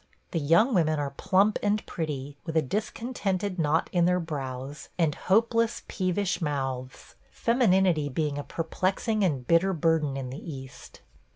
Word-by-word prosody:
The 165 - 0
young 170 - +4
women 155 -5 +2
are 145 -1 -2
plump 195 +7 +2
and 210 0 0
pretty, 145 -4 -4
with 160 -1 -2
a - - +5
discontented 200 - -2
knot 160 +1 +2
in 175 -2 +3
their 180 +1 +3
brows, 140 -3 -5
and 165 -4 +2
hopeless, 230 +5 +1
peevish 185 0 -1
mouths 135 -4 -3
– - - -34
femininity 190 - +2
being 145 +1 -1
a - - -4
perplexing 190 - -1
and 140 -9 0
bitter 170 +6 +3
burden 160 -4 +1
in 130 -2 -5
the 135 - -7
East. 130 -1 -11
165 Hz, 155 wpm, -27 LUFS, 145-195 Hz, -, a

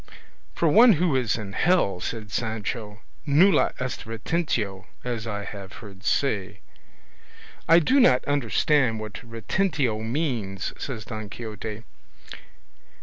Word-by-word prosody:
"For 170 - +2
one 225 +8 +7
who 170 -3 +1
is 125 -5 +1
in 100 -3 -7
hell," 160 - +2
said 110 +1 -5
Sancho, 110 -1 -3 0.3
"nulla 170 +8 +5
est 125 -3 -4
retentio, 115 - -2 0.2
as 115 -2 -4
I 105 -2 -3
have 100 -1 -8
heard 100 -3 -12
say." 105 -7 0 1.1
"I 165 - +8
do 255 - +4
not 130 - +5
understand 140 -2 +2
what 110 -1 -7
retentio 120 - -1
means," 115 - -2
said 115 -6 -6
Don 110 -3 -6
Quixote. 110 -1 -7
115 Hz, 120 wpm, -25 LUFS, 105-145 Hz, 1.1 s, I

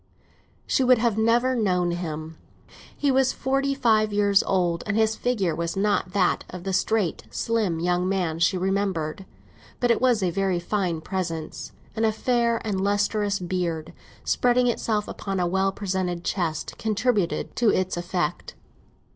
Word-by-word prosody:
She 265 - +1
would 255 0 +5 0.2
never 230 +3 +3
have 240 - 0
known 180 -3 +1
him. 160 -2 -5 0.6
He 285 -1 +2
was 260 0 +3
forty 275 +1 0
five 220 -5 +3
years 205 -1 +3
old, 175 -3 0
and 200 +1 0
his 220 0 +2
figure 210 -10 0
was 170 +2 -3
not 195 -3 0
that 185 -3 +2
of 180 -1 -8
the 195 0 -3
straight, 190 -1 0
slim 215 -8 -1
young 180 +2 +1
man 175 -4 -1
she 170 +2 +3
remembered. 190 -2 -1 0.5
But 245 -1 +3
it 235 - +1
was 245 -5 +3
a 180 - +1
very 190 0 0
fine 175 -3 -1
person, 165 -4 -3 0.4
and 220 - -1
a 220 - +4
fair 235 +1 +1
and 195 -3 -1
lustrous 205 0 +1
beard, 175 -3 -3 0.3
spreading 250 0 +2
itself 220 -3 0
upon 195 -2 -4
a 180 - +1
well 190 +2 +1
presented 185 -3 -2
chest, 165 -6 -2
contributed 215 -4 0
to 235 -2 +4
its 185 -2 +1
effect. 175 -2 -3
195 Hz, 155 wpm, -25 LUFS, 175-220 Hz, 0.6 s, would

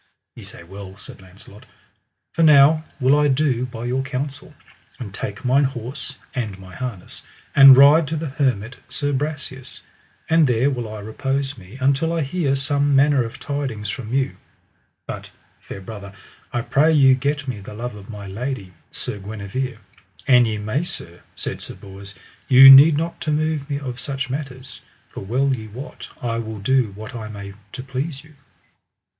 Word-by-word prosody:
Ye - - -11
say - - -12
well, 95 +2 -10
said 105 - -12
Launcelot, 95 +2 -16 0.7
for 165 - -1
now 155 0 +6 0.2
will 130 +1 +4
I 150 - +3
do 130 -3 +1
by 120 -1 -7
your 125 +2 0
counsel, 140 +1 -5 0.4
and 105 -6 -8
take 105 +3 -6
mine 135 +3 +4
horse 130 +2 -5 0.2
and 110 -6 -3
my 95 -1 -13
harness, 120 -6 -6 0.3
and 135 -2 +10
ride 145 +3 +7
to 160 - -3
the 160 -1 -3
hermit 130 -4 -1
Sir 145 0 0
Brasias, 140 -2 -4 0.5
and 160 -2 +4
there 125 +3 +2
will 120 -4 -4
I 110 -1 -7
repose 135 +6 -2
me 100 +2 -13
until 140 +5 +1
I 165 - 0
hear 140 -1 0
some 140 +1 +1
manner 140 -1 +4
of 115 - -7
tidings 135 -7 -4
from 115 -4 -7
you; 135 +1 0 0.7
but, - - -7 0.3
fair - - -9
brother, 100 0 -9 0.4
I 120 - -1
pray 150 +6 +3
you 135 -4 +6
get 140 +2 -1
me 125 -5 -4
the 100 +1 -10
love 120 +2 -5
of 100 0 -12
my 105 -2 -8
lady, 100 -1 -5 0.2
Queen 105 -5 -5
Guenever, 110 +5 -5 0.5
an 125 -2 +6
ye 110 -2 -2
may. 110 +7 -1
Sir, 85 - -5
said - - -5
Sir - - -6
Bors, 100 0 -11 0.3
ye 135 0 +10
need 145 +3 +9
not 165 +2 -3
to 155 - -1
move 155 -1 -1
me 140 - -1
of 130 -3 -6
such 135 -2 -3
matters, 135 -2 -6 0.3
for - - -9
well 130 +7 0
ye 110 -3 -8
wot 125 +7 -9
I 115 -4 -2
will 110 -1 -5
do 120 +1 +1
what 110 +5 -9
I 110 -3 -6
may 100 -2 -8 0.2
to 130 - -6
please 135 +2 -4
you. 155 0 -18
130 Hz, 175 wpm, -21 LUFS, 110-140 Hz, 0.7 s, and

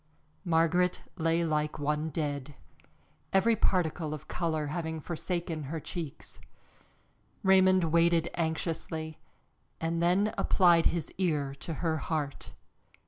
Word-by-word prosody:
Margaret 170 +2 +2
lay 165 -1 +1
like 150 -1 -1
one 150 +1 -1
dead, 145 -2 -3 0.8
every 195 +4 +4
particle 160 -6 0
of 150 - -12
color 160 -3 -1
having 160 +1 -3
forsaken 170 -1 -3
her 160 +4 -4
cheeks. 155 -1 -7 1.0
Raymond 190 -1 +5
waited 170 0 +3
anxiously, 160 -1 -3 0.6
and 165 +1 -1
then 185 +5 +2
applied 175 -3 +5
his 170 -2 -2
ear 150 -7 0
to 165 - -5
her 160 -1 +1
heart. 150 -2 -4
165 Hz, 110 wpm, -30 LUFS, 155-175 Hz, 1.0 s, Raymond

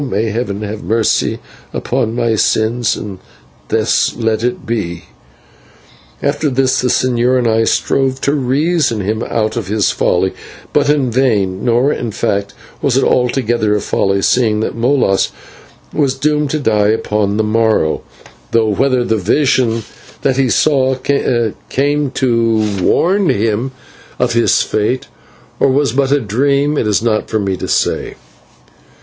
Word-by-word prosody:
May 110 0 -1
Heaven 105 -2 -3
have 105 +1 -5
mercy 110 +4 +1 0.5
on 110 - 0
my 120 -2 +1
sins, 110 +2 +1
and 100 -3 -7 0.5
thus 110 0 +1
let 115 -1 -1
it 125 0 -2
be." 85 -8 -3 1.2
After 145 +1 0
this 130 0 +1
the 125 - 0
señor 125 0 +2
and 120 -2 +1
I 115 0 +2
strove 135 +2 0
to 140 - +1
reason 140 -2 +1
him 110 +3 -2
out 110 -2 -1
of 115 -5 -3
his 105 0 +1
folly, 95 +1 0 0.4
but 145 -1 +2
in 140 -4 +2
vain, 105 -7 +1
nor, 125 +4 +2
in 120 - -4
fact, 100 -1 -2 0.3
was 135 -2 +1
it 135 - +2
altogether 120 -4 +1
a - - +1
folly, 100 -1 0
seeing 110 -4 +2
that - - -2
Molas 115 -5 +2 0.6
was 140 -3 +1
doomed 150 +1 0
to 155 - -1
die 105 -6 +2
upon 105 -1 0
the 110 - +1
morrow; 110 -7 +1 0.5
though 115 -1 +3
whether 125 +4 +1
the 110 -2 0
vision 115 +1 +1 0.4
that 130 -1 +1
he 135 -2 +2
saw 130 -1 +2 0.7
came 145 +1 0
to 115 -6 0
warn 190 - +2
him 110 +5 0 0.5
of 125 -1 0
his 115 0 +3
fate, 110 +5 -1 0.5
or - - +4
was 140 -1 +2
but 135 0 +1
a 145 - +4
dream, 140 +6 +1
it 115 - 0
is 105 +1 +1
not 110 -2 0
for 110 - 0
me 100 -2 -1
to - - -5
say. - - -1
115 Hz, 150 wpm, -15 LUFS, 105-135 Hz, 1.2 s, or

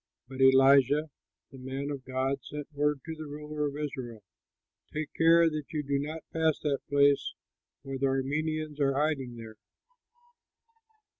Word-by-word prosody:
But 130 +1 -6
Elisha, 135 +3 +5 0.4
the 135 - -12
man 135 +2 -4
of 140 -2 -6
God, 130 +2 -1
sent 150 -1 -7
word 145 -1 0
to 160 - -5
the 155 -1 -8
ruler 150 0 -4
of 145 0 -6
Israel, 125 -7 -5 0.7
"Take 155 0 -4
care 165 +1 +5
that 155 -2 -2
you 150 -2 -2
do 140 0 0
not 155 +3 -5
pass 160 -2 +2
that 145 -3 0
place, 140 0 +3 0.5
for 135 -1 -5
the 135 - +2
Arameans 150 +3 -2
are 135 -1 +2
hiding 140 -4 -1
there." 110 -2 -10
145 Hz, 150 wpm, -29 LUFS, 135-150 Hz, 0.7 s, Elisha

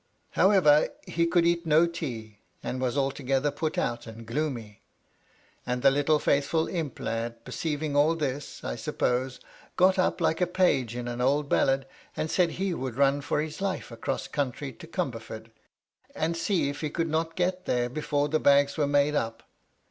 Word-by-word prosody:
However, 185 -7 +5 0.2
he 170 0 0
could 170 0 +3
eat 170 0 +1
no 160 +2 +5
tea, 120 -11 -6 0.2
and 130 - -3
was 130 +1 -1
altogether 135 +1 0
put 155 +4 -3
out 120 -9 -1
and 115 +1 -10
gloomy. 115 -4 -3 0.8
And 125 0 -3
the 135 - +7
little 145 +2 +3
faithful 150 +3 +1
imp 160 -7 -4
lad, 115 0 -4
perceiving 150 +2 -3
all 150 +3 +4
thisj 145 -3 -4
I - - -3
suppose, 125 +1 -1 0.4
got 185 +1 +4
up 185 - +1
like 160 0 +1
a 180 - +3
page 140 -10 +1
in 120 0 -4
an 120 0 -3
old 140 +3 +1
ballad, 135 0 +2 0.3
and 155 - -2
said 175 -3 +2
he 190 +1 -1
would 130 -6 -4
run 140 +1 +3
for 145 - 0
his 155 +3 -6
life 195 -9 -2
across 130 +3 -3
country 135 -1 -3
to 165 - -12
Comberford, 115 - -5 0.6
and 165 +2 -1
see 170 -2 +1
if 145 +1 -4
he 155 - -1
could 165 +2 -1
not 160 +1 -1
get 185 0 -1
there 120 -1 +1
before 145 +2 -1
the 155 +1 +1
bags 140 0 +4
were 150 -2 +2
made 145 +1 +3
up. 115 -5 -2
145 Hz, 180 wpm, -27 LUFS, 125-165 Hz, 0.8 s, the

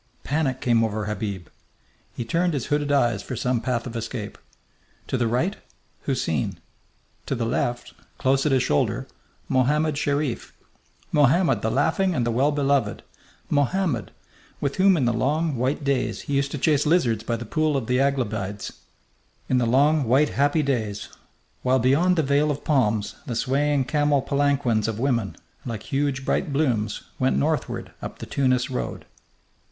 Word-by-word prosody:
Panic 140 -3 -1
came 115 -2 +3
over 110 -1 -1
Habib. 105 -4 -4 0.7
He 120 - -4
turned 170 +6 +1
his 135 - -2
hooded 145 -1 0
eyes 120 -7 +2
for 130 - -6
some 125 0 0
path 120 -1 -1
of 120 -2 -7
escape. 115 -2 -5 0.7
To - - -3
the 120 - +1
right, 145 - 0 0.5
Houseen! 80 - -1 0.7
To - - -1
the 115 - -1
left, 120 +1 -2 0.2
close 135 +1 +2
at - - +1
his 130 -2 +3
shoulder, 75 - 0 0.4
Mohammed 150 +3 +2
Sherif 145 -4 -1 0.6
Mohammed 145 - +3
the 110 - 0
laughing 190 - +1
and 120 - +1
the 120 - 0
well 135 +6 +2
beloved 140 -6 0 0.5
Mohammed, 145 - +1 0.5
with 140 -1 -2
whom 190 -1 +5
in 135 - +1
the 120 - +2
long, 150 +6 0
white 130 +5 -1
days 140 -2 0
he 145 - -5
used 140 0 +1
to - - -2
chase 145 +1 +2
lizards 120 - +2
by 115 - -1
the 115 +1 -6
pool 155 +4 +1
of 130 - -3
the 125 +2 +1
Aglabides... 110 -8 -1 0.8
in 130 - +3
the 120 - +1
long, 145 +4 +3
white, 135 +6 +3
happy 145 +3 +2
days, 110 -7 -2 0.5
while 130 +1 +3
beyond 140 +9 +3
the 160 - +2
veil 145 +2 +2
of 145 -1 -3
palms 110 -8 +1
the 120 - -3
swaying 140 +3 +1
camel 145 -1 +2
palanquins 140 -6 +1
of 110 -2 -2
women, 115 -5 -1 0.3
like 115 -3 -5
huge 135 -1 0
bright - - 0
blooms, 120 -8 0 0.2
went 65 0 +2
northward 70 - -1
up - - -7
the - - -7
Tunis 130 -2 +1
road.... 125 - -4
130 Hz, 165 wpm, -24 LUFS, 115-145 Hz, 0.8 s, whom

